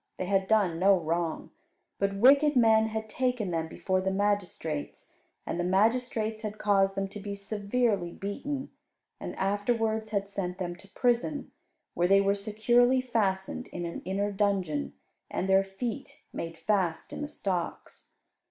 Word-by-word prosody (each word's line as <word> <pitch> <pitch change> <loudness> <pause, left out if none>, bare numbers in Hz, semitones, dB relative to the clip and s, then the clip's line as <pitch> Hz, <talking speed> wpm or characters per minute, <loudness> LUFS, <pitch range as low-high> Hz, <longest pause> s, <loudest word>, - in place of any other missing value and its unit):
They 185 - -2
had 190 0 +1
done 195 -6 +2
no 195 +1 +5
wrong, 165 0 -2 0.5
but 200 0 0
wicked 280 +7 +6
men 220 -2 +5
had 220 0 -4
taken 245 -4 -1
them 165 -1 -1
before 185 +3 -1
the 190 - 0
magistrates; 190 -6 -2 0.3
and - - -3
the - - +1
magistrates 220 +3 +1
had 215 -1 -5
caused 195 -2 +2
them 195 0 -1
to 210 - -8
be 200 0 -5
severely 200 -1 -1
beaten, 265 +10 -4 0.5
and - - -6
afterwards 220 +2 0
had 200 -2 -1
sent 185 -3 -4
them 175 -2 -3
to 195 - -16
prison, 245 +7 0 0.4
where 175 +1 +2
they 195 +1 +6
were 200 0 +3
securely 240 +5 +3
fastened 200 -7 -1
in 175 -1 -5
an 170 - -5
inner 200 +3 -1
dungeon, 190 - 0 0.4
and 190 - -2
their 195 0 +5
feet 195 +4 -6
made 165 0 -5
fast 185 -6 -1
in - - -5
the 295 - -2
stocks. 185 - -4
200 Hz, 155 wpm, -29 LUFS, 190-220 Hz, 0.5 s, wicked